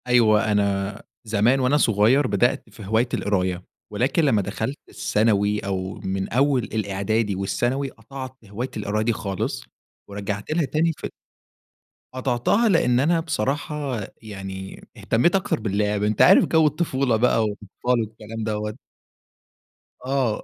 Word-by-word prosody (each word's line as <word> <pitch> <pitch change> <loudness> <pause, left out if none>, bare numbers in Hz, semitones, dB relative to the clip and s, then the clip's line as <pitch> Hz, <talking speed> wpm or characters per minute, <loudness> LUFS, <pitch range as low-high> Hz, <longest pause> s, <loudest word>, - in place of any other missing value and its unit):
أيوة، 110 -3 +4
أنا 100 0 0 0.2
زمان 110 +4 +2
وأنا 130 +3 +3
صغيّر 120 +3 +3
بدأت 120 -1 +1
في 105 -1 -11
هواية 110 +5 +2
القراية، 95 -3 0 0.3
ولكن 125 +10 +1
لمّا 120 -8 +3
دخلت 110 +7 -3
الثانوي 105 -1 +1
أو 95 -1 -3
من 95 0 -2
أول 135 0 +3
الإعدادي 105 0 -1
والثانوي، 120 +9 -1
قطعت 130 +3 -9
هواية 110 +6 -5
القراية 105 +1 -1
دي 115 +1 +1
خالص، 100 -3 -3 0.5
ورجعت 100 +2 -4
لها 160 0 +1
تاني 160 +4 +1
ف - - -7 1.1
قطعتها 130 - +1
لإن 125 -10 +3
أنا 165 +5 +3
بصراحة 145 -3 -2 0.2
يعني 95 -3 -8 0.2
اهتمّيت 145 +12 +2
أكتر 190 -9 0
باللعب. 105 -1 0
أنت 105 0 +1
عارف - - +7
جَو 160 -1 +4
الطفولة 140 -5 0
بقى 115 0 +3
والأطفال 105 -1 -6 0.2
والكلام 110 0 -6
دوّة. 105 0 -3 1.3
آه. 130 -5 0
110 Hz, 130 wpm, -23 LUFS, 100-130 Hz, 1.3 s, عارف